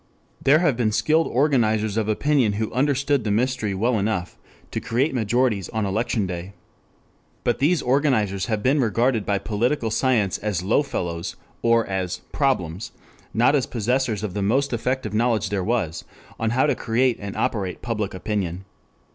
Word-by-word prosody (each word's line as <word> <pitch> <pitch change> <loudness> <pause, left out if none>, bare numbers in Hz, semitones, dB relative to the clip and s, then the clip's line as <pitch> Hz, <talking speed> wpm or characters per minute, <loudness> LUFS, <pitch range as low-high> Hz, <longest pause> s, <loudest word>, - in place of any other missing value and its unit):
There 140 +3 +6
have 155 -6 +2
been 115 -3 +1
skilled 160 +8 +2
organizers 110 -6 +2
of 110 -1 0
opinion 125 -1 +2
who 110 +1 -3
understood 140 0 +1
the 105 - -2
mystery 115 -2 0
well 115 +3 +1
enough 100 -4 -2 0.4
to - - -2
create 130 +7 0
majorities 115 -3 +1
on 110 -2 -1
election 105 +1 0
day. 90 +1 -6 0.9
But 120 - 0
these 155 +4 +2
organizers 120 -8 +1
have 110 -2 -1
been 140 +3 +3
regarded 115 -1 +1
by 100 - +2
political 115 +4 -1
science 110 -5 +1
as 105 -5 -2
low 100 - +3
fellows 85 - -4 0.3
or 115 -1 +3
as 95 -2 -3
"problems," 100 - -1 0.4
not 120 +5 +3
as 135 - +1
possessors 120 -2 -1
of 105 -4 -3
the 100 - -2
most 130 +7 +1
effective 120 -2 -2
knowledge 110 -2 +1
there 100 -2 0
was 105 -7 -1 0.4
on 115 - 0
how 125 +5 +2
to 150 - +2
create 120 +2 +1
and 100 -1 -6
operate 95 -5 -2
public 105 -5 -2
opinion. 95 -2 -3
110 Hz, 165 wpm, -23 LUFS, 100-130 Hz, 0.9 s, There